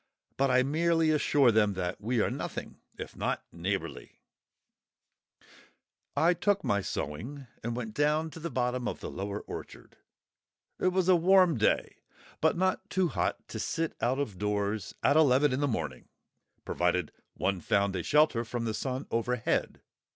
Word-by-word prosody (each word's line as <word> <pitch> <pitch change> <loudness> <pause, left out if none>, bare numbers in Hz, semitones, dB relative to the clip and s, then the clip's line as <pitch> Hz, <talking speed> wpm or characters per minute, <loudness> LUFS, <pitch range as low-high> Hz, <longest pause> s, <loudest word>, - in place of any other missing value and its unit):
But 135 0 +2
I 130 0 +4
merely 165 +3 +2
assure 145 -4 +4
them 105 -2 +3
that 90 +1 -3
we 115 +2 +1
are - - +1
nothing - - -5 0.2
if - - -7
not - - -2
neighbourly! 85 -8 -4 2.0
I 170 +2 +5
took 200 +3 +1
my 100 0 +1
sewing 115 - -5 0.2
and 115 +1 -3
went 115 -3 -5
down 150 +3 +1
to 165 - -9
the 170 +1 -4
bottom 125 0 -1
of - - -4
the - - -6
lower 100 +1 -4
orchard. - - -10 0.8
It - - +1
was 185 -1 +2
a 185 - +7
warm 180 -1 +5
day, 110 - +1 0.4
but - - +3
not 185 +1 0
too 185 -2 +1
hot - - -2
to - - -5
sit 165 -1 -2
out 125 +3 +1
of 115 -10 -3
doors 105 0 -1
at 145 - +4
eleven 145 -2 +4
in 130 - 0
the 145 - +1
morning, 80 - -4 0.6
provided 90 -2 0 0.2
one 95 -2 -1
found 100 +3 +1
a 90 - -1
shelter 150 - +3
from 120 0 -4
the 110 - -1
sun 130 +4 -3
overhead. 115 0 -1
125 Hz, 160 wpm, -30 LUFS, 105-155 Hz, 2.0 s, a